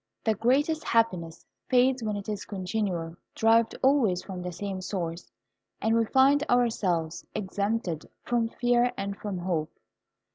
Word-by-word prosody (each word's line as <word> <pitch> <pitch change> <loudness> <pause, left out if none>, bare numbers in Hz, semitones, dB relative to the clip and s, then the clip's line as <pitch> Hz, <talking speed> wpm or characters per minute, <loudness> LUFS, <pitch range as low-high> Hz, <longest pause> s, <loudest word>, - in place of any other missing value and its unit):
The 220 - +2
greatest 275 +9 +1
happiness 180 -8 0 0.2
fades 255 0 +4
when 215 -2 -2
it 200 -1 -6
is 210 -2 -3
continual, 185 -4 -3 0.2
derived 225 0 +3
always 260 -10 +3
from 185 -2 -6
the 180 0 -4
same 190 +1 -5
source, 175 -3 -4 0.5
and 225 +1 +1
we 230 0 +3
find 270 +4 +4
ourselves 190 -10 +1
exempted 200 -4 -2
from 235 -2 0
fear 245 +1 +2
and 200 0 -3
from 200 -2 -5
hope. 170 -4 -2
210 Hz, 140 wpm, -27 LUFS, 180-240 Hz, 0.5 s, fades